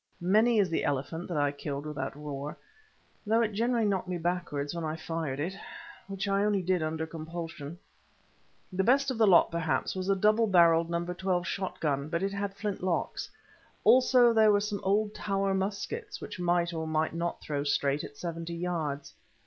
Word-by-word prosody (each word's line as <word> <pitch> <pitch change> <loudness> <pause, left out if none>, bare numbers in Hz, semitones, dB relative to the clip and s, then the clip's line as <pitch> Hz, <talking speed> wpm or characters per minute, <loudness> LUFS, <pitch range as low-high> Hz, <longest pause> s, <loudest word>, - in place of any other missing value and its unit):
Many 215 +6 +3
is 195 -5 +3
the - - 0
elephant 145 +4 -2
that 175 - -3
I 145 -1 +2
killed 145 0 -5
with 150 0 -5
that 135 +1 -3
roer, 145 0 -6 0.7
although 225 +2 +3
it 215 -2 -1
generally 230 +2 +1
knocked 195 -3 0
me 180 -1 -2
backwards 170 -4 -2
when 170 -1 -4
I 155 0 -2
fired 160 -4 -4
it, 170 +6 -2 0.5
which 195 0 -4
I 195 0 +2
only 205 -2 +1
did 180 -1 +1
under 160 0 -2
compulsion. 165 -1 -7 1.0
The 190 +1 +1
best 275 +4 +3
of 240 - -4
the 220 - +5
lot, 180 -3 +6
perhaps, 165 -2 -1
was 185 +1 -3
a 195 - +4
double 215 +3 +3
barrelled 170 -3 +5
No. 170 0 -1
12 180 0 -1
shot 190 +1 -3
gun, 140 -1 -1
but 170 +2 -1
it 195 0 -1
had 200 0 -3
flint 205 -1 -3
locks. 180 -2 -2 0.5
Also 250 -2 +6
there 220 -1 +6
were 205 - +4
some 205 0 -3
old 205 +2 +1
tower 195 -2 -1
muskets, 210 - -3
which - - -8
might 175 -1 +1
or 160 -1 -3
might 155 0 0
not 170 +1 -2
throw 145 -2 -3
straight 145 0 +1
at 145 - -9
seventy 170 -1 -5
yards. 160 -5 -3
175 Hz, 190 wpm, -29 LUFS, 160-200 Hz, 1.0 s, lot